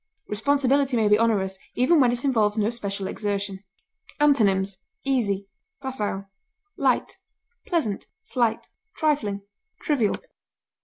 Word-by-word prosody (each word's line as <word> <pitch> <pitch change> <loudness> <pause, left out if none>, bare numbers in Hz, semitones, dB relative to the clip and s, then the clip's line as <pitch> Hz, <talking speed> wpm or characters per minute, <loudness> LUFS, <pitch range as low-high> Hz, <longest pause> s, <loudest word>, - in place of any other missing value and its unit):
Responsibility 270 +3 +2
may 220 -2 +3
be 210 +1 +5
onerous 195 -4 +1 0.2
even 285 +7 +4
when 250 -3 +5
it 245 +2 -2
involves 220 -5 +2
no 215 +1 +2
special 200 -4 -3
exertion. 200 -1 -3 0.6
Antonyms: 200 -10 +3 0.3
easy, 205 -8 +1 0.3
facile, 210 -8 -3 0.5
light, - - +1 0.5
pleasant, 310 - -1
slight, 235 -3 0 0.3
trifling, 235 - 0 0.4
trivial. 250 -9 +1
220 Hz, 105 wpm, -25 LUFS, 200-265 Hz, 0.6 s, be